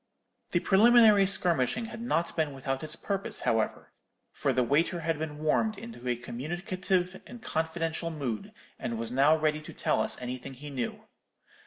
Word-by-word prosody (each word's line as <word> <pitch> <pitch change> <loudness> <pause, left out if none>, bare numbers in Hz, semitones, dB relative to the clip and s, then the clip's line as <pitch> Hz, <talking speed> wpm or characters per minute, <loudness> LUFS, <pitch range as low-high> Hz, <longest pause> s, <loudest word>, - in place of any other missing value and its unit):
The 175 - +2
preliminary 215 -1 +6
skirmishing 180 - +1
had 225 0 -8
not 170 -8 -1
been 155 -3 0
without 135 +1 -3
its 155 0 -1
purpose, 195 -1 -3
however; 110 -1 0 0.4
for 140 - 0
the 125 -1 +2
waiter 165 +7 +1
had 160 -1 -1
been 155 -1 -4
warmed 175 +8 +1
into 225 - -9
a 125 - +2
communicative 175 +9 -2
and 245 - -10
confidential 165 -3 -2
mood, 135 -9 -4 0.3
and 115 - -3
was 115 +1 -3
now 140 +5 +5
ready 155 0 0
to 155 - -10
tell - - +1
us - - +1
anything 125 +2 -6
he 145 +3 -9
knew. 125 -4 -4
155 Hz, 165 wpm, -29 LUFS, 135-185 Hz, 0.4 s, preliminary